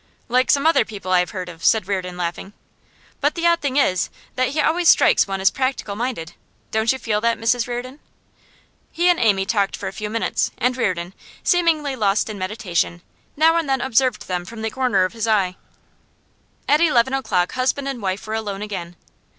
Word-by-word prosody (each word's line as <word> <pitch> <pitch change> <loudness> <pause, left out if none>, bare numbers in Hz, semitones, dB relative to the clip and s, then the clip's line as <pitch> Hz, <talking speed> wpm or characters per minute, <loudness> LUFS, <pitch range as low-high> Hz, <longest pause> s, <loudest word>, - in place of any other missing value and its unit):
'Like 255 +2 +2
some 280 +1 +3
other 325 - +5
people 195 -4 -7
I 180 - +5
have 180 - 0
heard 185 -2 -5
of;' 165 -2 -11
said 220 -4 +3
Reardon, 185 -3 -3
laughing. 175 +3 -4 0.7
'But 290 +1 +1
the 340 0 -2
odd 340 0 +3
thing 280 -2 -1
is, 185 -10 +2 0.3
that 255 0 +1
he 285 +4 -3
always 335 +3 +3
strikes - - +5
one 195 0 -3
as 190 - +3
practical 260 -6 -2
minded. 225 -8 -4 0.4
Don't 220 +1 +2
you 265 - -2
feel 215 -4 -1
that, 230 0 +1
Mrs 230 +1 +1
Reardon?' 250 +3 -5 0.9
He 350 +2 +2
and 350 - +3
Amy 200 -4 +2
talked 200 -2 0
for - - -5
a - - -5
few 210 0 -5
minutes, 225 +1 -1
and 250 +1 +1
Reardon, 185 -7 -2 0.3
seemingly 320 -6 +2
lost 210 -2 +1
in 205 - -8
meditation, 185 -3 -2 0.3
now 325 +2 +4
and 325 -4 -1
then 270 0 +2
observed 250 -4 +1
them 180 -1 -2
from 220 +4 -9
the 220 - -2
corner 240 -6 +2
of 185 - -5
his 225 -1 -3
eye. 195 -4 +2 1.1
At 295 +2 +4
eleven 265 -6 +3
o'clock 180 -10 0
husband 265 +2 -1
and 270 -4 -4
wife 190 0 -3
were 215 - -5
alone 205 -2 -3
again. 175 -5 -6
225 Hz, 200 wpm, -21 LUFS, 195-265 Hz, 1.1 s, other